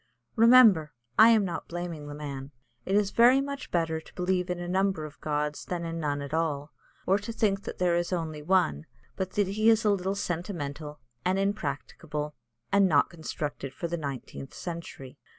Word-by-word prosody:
Remember, 225 -9 +6 0.3
I 220 +1 +10
am 220 -3 +5
not 175 - -4
blaming 170 -3 -5
the 145 - -7
man; 140 -2 -6 0.4
it 195 - +1
is 205 -1 +2
very 245 +3 +6
much 280 0 -4
better 165 -2 0
to - - -17
believe 180 0 0
in 180 - -1
a 175 0 -5
number 190 -3 0
of 150 -1 -12
gods 150 -1 -2
than 175 -2 -3
in 165 0 -4
none 145 -2 -1
at 140 - -7
all, 155 -2 -1 0.3
or 195 +2 +3
to 205 +3 -6
think 205 -3 0
there 180 -1 0
is 175 +1 -1
only 160 -4 -3
one, 165 - +1 0.3
but 190 -1 -3
that 205 -2 +1
he 215 +3 +3
is 225 -1 +4
a 210 - +5
little 195 0 0
sentimental 160 -5 -4 0.2
and 185 +1 +1
impracticable, 150 -5 -3 0.4
and 200 -1 +5
not 145 -3 +3
constructed 150 -4 -5
for 170 - -3
the 170 - -2
nineteenth 135 -3 -6
century. 165 -6 -7
170 Hz, 185 wpm, -28 LUFS, 150-195 Hz, 0.4 s, I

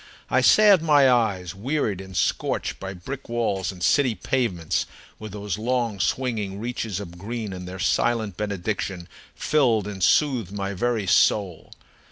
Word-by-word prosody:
I - - +4
salved 205 -5 +6
my 145 -4 +5
eyes, 100 -7 0
wearied 110 - -2
and 95 -1 -8
scorched - - -1
by 95 0 -6
brick 130 +11 -8
walls 105 -6 -1
and 90 -2 -9
city 130 -1 +3
pavements, 105 -13 -1 0.3
with 110 -1 -8
those 105 -1 -4
long, 120 -3 -1
swinging 105 -1 -1
reaches 115 -4 -3
of 90 -3 -9
green, 110 0 -5
and 90 -1 -7
their 90 +1 -7
silent 110 +1 0
benediction 100 -3 -3 0.3
filled 120 -9 +2
and 95 -3 -5
soothed 125 - +2
my 100 -1 -3
very 110 +2 -1
soul. 95 -1 +2
105 Hz, 150 wpm, -24 LUFS, 95-120 Hz, 0.3 s, salved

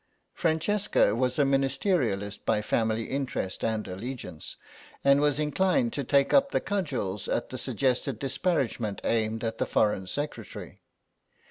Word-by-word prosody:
Francesca 165 - +2
was 125 +1 0
a 145 - +5
Ministerialist 135 - 0
by 110 - +2
family 110 +1 +1
interest 130 -8 -3
and 110 -2 -1
allegiance, 95 - -6 0.5
and 140 +1 +5
was 145 -1 +2
inclined 190 - +1
to 140 - -1
take 140 +1 +3
up 280 0 +5
the - - +1
cudgels 140 - -2
at - - -1
the - - -4
suggested 130 -2 0
disparagement 130 - -1
aimed 115 0 0
at 115 -1 -3
the - - 0
Foreign 105 -3 +1
Secretary. 120 -2 -6
130 Hz, 135 wpm, -28 LUFS, 110-150 Hz, 0.5 s, a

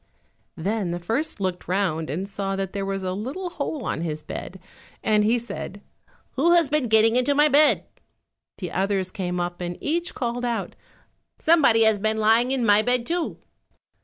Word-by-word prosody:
Then 195 +2 -1
the 175 +1 -3
first 225 - -2
looked 185 -2 -3
round 175 -5 0
and 180 +8 -3
saw 195 -1 -3
that 195 -1 -3
there 200 -1 -3
was 195 -1 -3
a 185 0 -2
little 275 - -5
hole 285 -5 -4
on - - -2
his 155 -2 -4
bed, 190 - -7 0.4
and 210 -1 +3
he 225 +3 +3
said, 225 -4 -6 0.5
"Who 330 +6 +3
has 340 -3 +4
been 290 -3 0
getting 220 +1 +4
into 280 +3 +2
my 295 +1 +5
bed?" 295 +2 +4 0.7
The 180 -3 -5
others 190 -1 -1
came 180 -4 -3
up 175 0 -3
and 175 0 -4
each 340 +3 -2
called 245 0 -2
out, 235 -2 -2 0.6
"Somebody 285 -9 +4
has 220 -2 +3
been 215 +2 0
lying 225 +3 +3
in 260 -3 0
my 205 0 +5
bed 245 +1 0
too." 340 +2 -2
215 Hz, 180 wpm, -24 LUFS, 190-255 Hz, 0.7 s, my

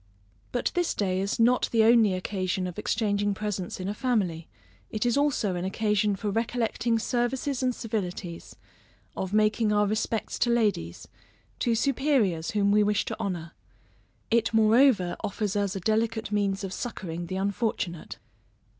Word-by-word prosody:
But 245 - -1
this 350 -1 0
day 190 -2 0
is 200 +3 -2
not 245 +2 +3
the 225 -2 +4
only 220 -4 +5
occasion 185 0 -2
of 180 +2 -5
exchanging 205 -2 0
presents 200 -4 -4
in 185 - -4
a 205 - -1
family, 200 -9 -1 0.4
it 215 +2 -2
is 240 - +2
also 280 -9 +1
an 175 0 -3
occasion 210 +1 +1
for 205 +1 -3
recollecting 230 +1 0
services 245 +4 -1
and 255 -1 +1
civilities; 180 -6 -5 0.6
of 190 - -3
making 215 +1 +2
our 210 0 +3
respects 215 +1 -2
to 240 - +2
ladies, 210 - 0 0.5
to 235 -2 +1
superiors 240 - +1
whom 200 -1 +2
we 210 +1 +5
wish 210 0 +1
to - - -4
honor. 175 -6 -3 0.8
It 230 -1 +2
moreover 220 -4 +4
offers 205 0 -2
us 200 -1 0
a - - -2
delicate 220 +1 0
means 200 -1 0
of 190 -1 -4
succoring 175 -8 -5
the 185 - -4
unfortunate. 195 -3 -2
210 Hz, 155 wpm, -27 LUFS, 190-230 Hz, 0.8 s, only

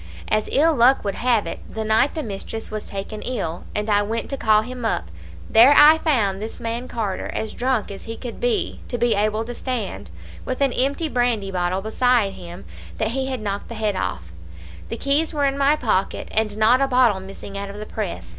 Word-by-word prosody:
As 215 0 +1
ill 320 +4 +4
luck 255 +2 +4
would 200 -1 -1
have 235 -1 +1
it, - - -5
the 220 - -3
night 220 +8 +2
the 310 - -2
mistress 220 +1 -6
was 215 -1 -5
taken 200 +2 -6
ill, 185 -9 -4
and 210 +1 -1
I 205 -1 +3
went 225 +5 -3
to - - -1
call 215 -4 +3
him 250 +1 -7
up, 85 - -1 0.4
there 245 +6 +7
I 305 +2 +8
found 210 - +1
this 220 +1 -6
man 235 +2 -4
Carter 215 -6 -3
as 220 -1 -3
drunk 250 -4 -1
as 195 - -9
he 225 0 -6
could 245 -2 -7
be, 485 -4 0
to 245 - -3
be 240 0 +2
able 215 +2 0
to 245 - -6
stand, 240 -5 -4 0.3
with 255 - -4
an 275 -3 +2
empty 280 +5 +1
brandy 240 -7 0
bottle 180 +1 -1
beside 225 -2 +2
him 175 +1 -10 0.3
that 220 - 0
he 265 +3 -2
had 260 -3 -3
knocked 200 -1 -3
the 235 - -6
head 215 -2 -1
off. 135 - -2 0.7
The - - -4
keys 300 +3 +1
were 290 -1 +2
in 275 0 +1
my 280 +1 +3
pocket, 215 -9 -1
and 215 -1 0
not 230 +5 +4
a 275 - +3
bottle 250 -6 +3
missing 195 +1 -10
out 200 0 -4
of 200 - -8
the 215 - -6
press. 175 - -5
225 Hz, 215 wpm, -22 LUFS, 205-255 Hz, 0.7 s, I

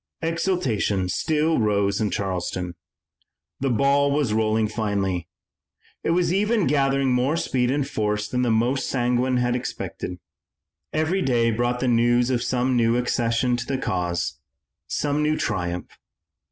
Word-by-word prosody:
Exultation 150 - 0
still 155 - +1
rose 100 -1 +1
in 105 - +1
Charleston. 90 -3 -3 0.9
The 135 - 0
ball 140 +3 +3
was 140 -6 +1
rolling 110 0 +2
finely. 100 -5 -2 0.8
It - - -1
was 175 +1 +2
even 210 +1 +2
gathering 135 -1 +2
more 130 +6 +1
speed 125 -6 0
and 140 0 0
force 105 -4 -1
than 125 +3 -1
the 125 - +1
most 120 +4 +1
sanguine 125 0 +1
had 120 0 +1
expected. 120 -7 -5 0.7
Every 155 +5 0
day 120 -6 +2
brought 120 +2 -1
the 130 - +1
news 120 +1 +3
of 120 -2 +1
some 125 +1 0
new 115 0 +3
accession 120 0 +1
to 120 - -4
the 135 - -1
cause, 90 -7 -2 0.5
some 145 0 -1
new 155 0 +1
triumph. 90 -4 -3
125 Hz, 140 wpm, -24 LUFS, 110-140 Hz, 0.9 s, ball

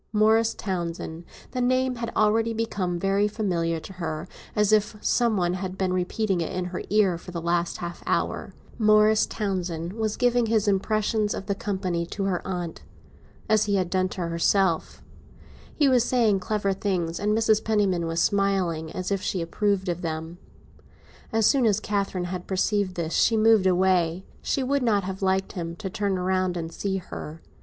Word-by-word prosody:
Morris 220 +1 +3
Townsend—the 170 +3 -5
name 255 0 +1
had 230 0 -4
already 225 +2 +2
become 200 -6 -2
very 195 +3 +2
familiar 175 -6 -1
to 190 - -10
her, 165 -1 -4 0.3
as 210 0 +3
if 210 0 +2
some 235 0 +2
one 175 -1 +1
had 185 0 -4
been 185 -1 0
repeating 185 +1 0
it 165 - -3
in 185 -1 -2
her 180 0 -4
ear 195 -5 +3
for 180 - -12
the 175 -1 -4
last 170 +1 0
half 170 0 -6
hour—Morris 215 0 +2
Townsend 180 -4 -3
was 220 -1 -2
giving 245 -1 +2
his 220 -1 +1
impressions 210 +2 +1
of 195 - -6
the 200 - 0
company 190 -4 -2
to 195 - -4
her 190 -3 0
aunt, 175 -3 -4 0.7
as 215 -1 +3
he 200 -1 +1
had 185 -3 0
done 185 0 +1
to 185 - -6
herself; 170 +1 +1 0.7
he 290 - +3
was 255 -3 +4
saying 230 -6 +2
clever 200 +1 -1
things, 185 -4 -2
and 210 +1 +1
Mrs. 220 -1 +3
Penniman 195 -6 +1
was 165 0 -1
smiling, 185 -5 +1
as 185 +2 -4
if 195 -1 0
she 190 - -2
approved 190 +3 0
of 175 0 -2
them. 160 +1 -5 0.9
As 225 -2 +2
soon 260 -2 +4
as 210 -1 +2
Catherine 200 -4 -2
had 180 -1 -6
perceived 195 0 0
this 170 -2 -3
she 225 - +3
moved 220 -3 +5
away; 180 -1 +2 0.2
she 270 - -1
would 280 +2 +1
not 210 -5 +2
have 190 +1 -5
liked 190 0 +1
him 170 -2 -5
to 190 +1 -6
turn 200 -1 -1
round 185 0 0
and 165 -1 -5
see 195 -1 -2
her. 165 -3 -8
195 Hz, 175 wpm, -25 LUFS, 175-215 Hz, 0.9 s, moved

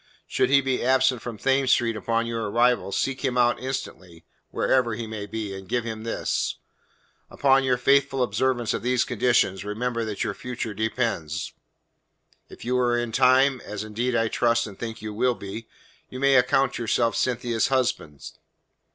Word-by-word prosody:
Should - - 0
he 140 0 +5
be 130 -1 -1
absent 130 -1 +3
from 120 -3 -6
Thames 135 +2 +1
Street 115 -2 +2
upon 115 +1 -1
your 115 -2 -3
arrival, 120 -1 +2
seek 135 +7 -2
him 130 -2 0
out 120 0 +3
instantly, 95 -10 -6 0.2
wherever 120 -4 +1
he 115 +1 -5
may 110 -2 -6
be, 105 -1 -5
and 95 -1 -9
give 120 -1 0
him 110 -1 -5
this. 115 - -1 0.7
Upon 135 -1 +3
your 130 -2 +2
faithful 135 +1 +2
observance 120 +1 0
of - - -3
these 125 0 +1
conditions 120 -5 +1
remember 115 +3 -2
that 110 -2 -3
your 110 - -2
future 120 -1 -5
depends. 105 -8 -2 1.0
If - - -12
you 125 +1 +1
are 120 -1 +2
in 120 -1 -2
time, 130 +1 +4
as 105 0 -5
indeed 120 +4 -2
I 115 -1 +2
trust 115 +1 +1
and 100 -3 -10
think 115 -1 -6
you 105 -1 -5
will 125 +3 +1
be, 110 +3 -8 0.4
you 130 - -7
may 140 0 +3
account 135 +1 +3
yourself 115 0 +1
Cynthia's 120 -2 0
husband. 120 - -1
120 Hz, 170 wpm, -25 LUFS, 110-130 Hz, 1.0 s, he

